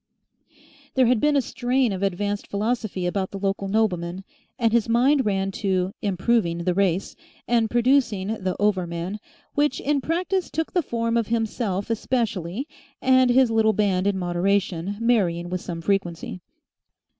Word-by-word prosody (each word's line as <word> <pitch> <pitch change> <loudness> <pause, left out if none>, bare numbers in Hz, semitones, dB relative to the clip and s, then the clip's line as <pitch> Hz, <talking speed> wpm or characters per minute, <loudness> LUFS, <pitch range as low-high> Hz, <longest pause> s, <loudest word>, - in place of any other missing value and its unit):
There 260 -1 +5
had 245 -1 +3
been 295 0 +3
a 275 - +3
strain 250 -1 0
of 190 -1 -4
advanced 200 +1 -1
philosophy 210 -3 -2
about 190 +1 -1
the 200 - -6
local 195 0 -2
nobleman, 190 -4 0 0.3
and 230 -2 +1
his 235 -1 +2
mind 260 +3 +3
ran 195 -1 0
to 190 -2 0
"improving 190 -3 0
the 180 0 +1
race" 190 -1 0 0.3
and 230 -2 +2
producing 240 -5 +2
the 185 -1 -1
Over 195 -4 +1
Man, 170 +5 -4 0.3
which 290 -2 +1
in 285 -1 0
practice 360 +5 -1
took 320 +1 -3
the 360 - +3
form 230 -4 -1
of 230 -3 0
himself 225 -3 -1
especially 225 - -2 0.3
and 260 -1 +4
his 250 -1 +4
little 220 -1 +3
band 195 -3 +1
in 200 -1 +1
moderation 185 +1 0
marrying 180 -8 +1
with 180 -1 -2
some 170 -1 -5
frequency. 180 -1 -2
205 Hz, 155 wpm, -24 LUFS, 185-240 Hz, 0.3 s, There